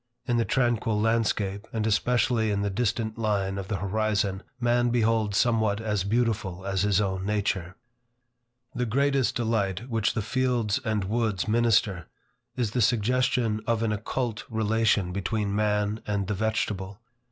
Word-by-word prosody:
In 120 -2 +1
the 115 - +2
tranquil 120 -4 +1
landscape, 105 -2 0
and 110 -2 -2
especially 115 +1 +2
in 100 -1 0
the 100 - -1
distant 110 +1 -1
line 100 -3 0
of 95 - -6
the 100 - -2
horizon, 100 0 0 0.2
man 120 0 +2
beholds 110 -3 +1
somewhat 110 -3 +2
as 105 -3 -1
beautiful 105 -4 -1
as 95 -1 0
his 100 -1 +2
own 95 -2 -1
nature. 95 -3 -1 1.0
The 125 -1 -1
greatest 140 +2 +1
delight 110 -2 -1
which 110 -2 +1
the 110 - -1
fields 125 -2 0
and 110 -4 0
woods 105 -1 -1
minister, 110 -6 +2 0.5
is 120 -5 -1
the 125 - 0
suggestion 120 0 +1
of 115 -1 +1
an 110 - +1
occult 110 +2 -3
relation 110 -4 +1
between 100 +1 -1
man 105 0 0
and 100 -1 -1
the 105 - -2
vegetable. 100 -2 -2
110 Hz, 150 wpm, -27 LUFS, 100-115 Hz, 1.0 s, the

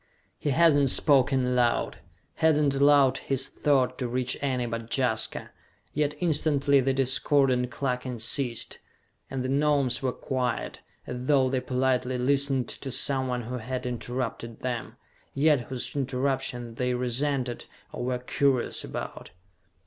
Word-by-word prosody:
He 150 - -2
had 165 +2 +4
not 140 -2 +3
spoken 135 -2 +3
aloud, 125 -1 0 0.4
had 160 -2 +3
not 145 -2 +2
allowed 140 -1 +4
his 135 -1 +1
thought 130 -3 +1
to 125 - -1
reach 125 +1 -1
any 130 -3 -1
but 115 -1 -5
Jaska; 115 -4 0 0.4
yet 150 0 0
instantly 145 -4 +2
the 135 +1 +1
discordant 130 -1 +2
clucking 125 -1 -3
ceased, 115 +1 0 0.5
and 135 -2 -3
the - - -2
Gnomes 140 -2 +1
were 130 -1 0
quiet, 125 -1 -3 0.2
as 125 +1 -6
though 135 -3 +3
they 130 - +1
politely 130 -1 0
listened 135 -1 +1
to 135 - -5
someone 130 -1 +1
who 125 +3 -5
had 125 +3 -5
interrupted 120 -1 -4
them, 120 -3 -4 0.4
yet 145 0 +4
whose 125 -1 -4
interruption 130 -3 -2
they 125 +1 -1
resented, 125 0 -1 0.3
or - - -5
were 125 0 -1
curious 125 0 0
about. - - -7
130 Hz, 140 wpm, -27 LUFS, 125-140 Hz, 0.5 s, had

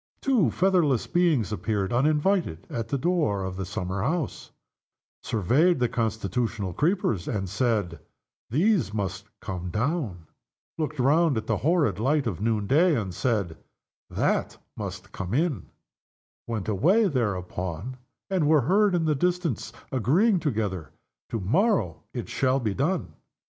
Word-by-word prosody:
Two 240 - +3
featherless 175 - +2
beings 165 - +2
appeared, 105 0 -1
uninvited, 150 - +1
at 115 -1 -3
the 140 - -1
door 145 - +1
of 95 0 -4
the 95 -1 -4
summer 95 -1 -3
house, 155 - -2 0.7
surveyed 135 - +2
the 125 -1 +2
constitutional 110 -3 -2
creepers, 150 - 0
and 95 -2 -2
said, 105 - 0 0.5
"These 160 - +2
must 100 -1 -3 0.2
come 90 -2 -5
down" 110 - -2 0.5
looked 155 -2 -3
around 145 +2 +3
at 110 - -3
the 110 - 0
horrid 145 - +1
light 140 +4 +1
of 100 -7 -3
noonday, 115 - +3
and 95 -4 -4
said, 100 -7 -1 0.5
"That - - 0 0.2
must 100 -1 -6
come 95 +3 -4
in" 145 - 0 0.8
went 110 -5 -3
away, 180 - +3
thereupon, 95 - -3 0.3
and 185 -6 +1
were 155 -1 +5
heard, 195 - +3
in 165 -2 +1
the 155 - +3
distance, 175 - -1 0.2
agreeing 175 - +3
together, 105 - -2 0.4
"To 115 - -2
morrow 105 - +1
it - - -5
shall 130 0 +1
be 110 -5 -1
done." 165 - -1
120 Hz, 135 wpm, -26 LUFS, 100-160 Hz, 0.8 s, were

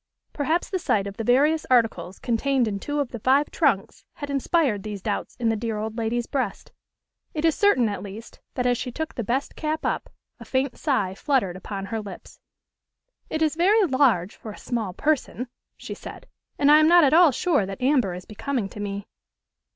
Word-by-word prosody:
Perhaps 315 +7 -1
the 375 - 0
sight 205 - +1
of 200 0 -7
the 225 - -3
various 290 +7 +3
articles 225 -6 +2
contained 245 +1 +1
in 200 -2 -2
two 290 +7 -3
of 280 -4 -1
the 235 - -6
five 270 +6 +3
trunks 260 - 0
had 285 -1 -6
inspired 275 - +1
these 210 0 -6
doubts 205 +2 -3
in 235 -2 0
the 225 - +1
dear 225 0 -3
old 220 +1 -4
lady's 230 +1 -1
breast: 270 0 -3 0.6
it 305 +1 0
is 325 - +4
certain, 345 - +3
at 205 -3 -3
least, 205 +3 -10 0.2
that, 250 - -1
as 245 -1 +2
she 250 - -4
took 315 +5 -4
the 235 - -3
best 260 +6 -2
cap 310 0 -3
up, - - -2 0.3
a - - -9
faint 260 -1 -1
sigh 230 - 0
fluttered 200 - 0
upon 195 +1 -6
her 220 +3 -3
lips. 200 -3 -11 0.9
"It 315 0 0
is 310 - +2
very 395 +5 +4
large 260 - +2
for 220 - -9
a - - -11
small 225 -6 -3
person," 255 +1 -1 0.3
she - - -7
said. - - -10 0.3
"And 285 0 +4
I 305 - +8
am 310 - +5
not 345 +1 +7
at 285 - +4
all 340 0 +7
sure 280 - +1
that 195 +3 -6
amber 250 -8 +2
is 180 +1 -9
becoming 220 0 -3
to 210 - -10
me." 200 0 -4
245 Hz, 205 wpm, -24 LUFS, 210-295 Hz, 0.9 s, I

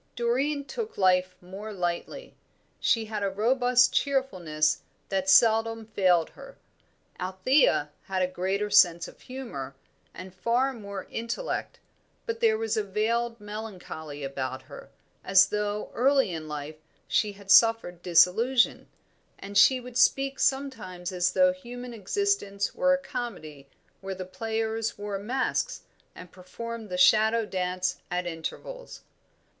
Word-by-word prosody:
Doreen 270 +5 0
took 445 +7 -6
life 185 -1 +2
more 195 +4 -8
lightly; 180 - -4 0.5
she 225 -2 +2
had 215 -1 -4
a 200 - 0
robust 245 +4 +3
cheerfulness 175 - 0 0.3
that 190 -1 -1
seldom 225 +2 +4
failed 185 -6 +2
her. - - -13 0.6
Althea 185 - +2
had 190 -1 -1
a - - +2
greater 190 +3 -2
sense 175 -4 +5
of - - -15
humour, 185 - -7 0.4
and 185 0 -10
far 240 +8 0
more 200 -5 -7
intellect; 235 - -4 0.5
but 460 -1 -3
there 450 -2 +3
was 450 0 -1
a 215 - 0
veiled 230 +4 -1
melancholy 190 -8 -8
about 130 -1 -4
her, - - -12 0.3
as 195 0 +5
though 210 0 -2
early 265 -5 +2
in 160 -1 -6
life 150 0 -6 0.3
she 210 -2 +1
had 200 -1 -6
suffered 225 -6 +5
disillusion; 190 +9 +3 0.5
and 200 +1 -9
she 200 +7 +6
would 250 0 -5
speak 275 0 +3
sometimes 225 -11 -1
as 180 0 0
though 275 0 +4
human 245 -2 -9
existence 210 - -1
were 275 - +2
a - - -1
comedy 230 - -7 0.3
where 190 0 -6
the 185 0 -6
players 225 +3 -3
wore 205 -1 -4
masks 260 - -2 0.3
and 180 - -12
performed 225 +4 -8
the 180 - -3
shadow 220 +4 +4
dance 185 -1 -2
at 180 0 -2
intervals. 175 - -7
210 Hz, 135 wpm, -27 LUFS, 185-245 Hz, 0.6 s, she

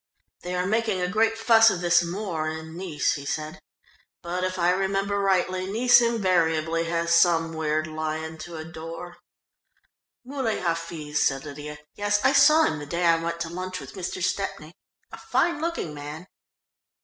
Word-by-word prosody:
"They 180 +1 -4
are 180 0 0
making 220 -1 0
a 180 - 0
great 225 +4 +1
fuss 225 0 +6
of 185 - -2
this 175 -1 +4
Moor 170 -3 -3
in 160 +1 -7
Nice," 175 -4 -1
he 145 - -6
said, 155 +2 -4 0.6
"but 175 +1 -3
if 185 0 -2
I 175 0 +3
remember 195 +2 0
rightly, 185 -1 +1
Nice 245 +3 +5
invariably 170 -7 +1
has 170 0 0
some 165 -1 +3
weird 155 -1 -1
lion 155 0 -4
to 170 +1 -8
adore." 165 +2 -8 1.1
"Muley 260 -4 -2
Hafiz," 165 -3 -2
said 135 0 +1
Lydia. 150 +1 -8 0.2
"Yes, 205 0 0
I 270 - +5
saw 305 +3 +6
him 155 - 0
the 145 - -8
day 170 +3 -1
I 165 -1 +4
went 170 0 -3
to 165 - -3
lunch 185 +2 -5
with - - -10
Mr. 185 -1 -5
Stepney, 175 -4 -3 0.4
a - - -9
fine 340 -4 0
looking 330 - -3
man." 150 +4 -8
175 Hz, 165 wpm, -25 LUFS, 160-195 Hz, 1.1 s, fuss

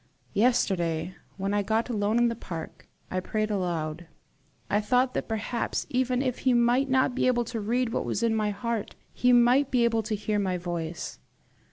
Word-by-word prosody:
Yesterday, 185 -7 +1 0.2
when 195 +1 -1
I 205 - +2
got 220 +3 0
alone 215 -2 0
in 240 0 +4
the 230 - -1
park, 170 -8 -8 0.2
I 185 - 0
prayed 215 +3 -2
aloud: 170 -4 -2 0.6
I 205 - +1
thought 250 +4 +2
that - - -2
perhaps, 225 +1 -2
even 255 0 +1
if 255 -2 -2
he 255 -2 +2
might 240 +3 +3
not 260 -1 +3
be 255 - +1
able 240 -1 +2
to 230 0 -4
read 240 +3 0
what - - 0
was - - -2
in 230 -1 +2
my 215 -1 +1
heart, 215 +1 -3 0.2
he 250 - +3
might 245 +3 +5
be 250 -2 +2
able 230 -1 +2
to 215 0 -2
hear 210 0 -1
my 185 -2 0
voice. 170 -2 -5
220 Hz, 190 wpm, -27 LUFS, 195-245 Hz, 0.6 s, might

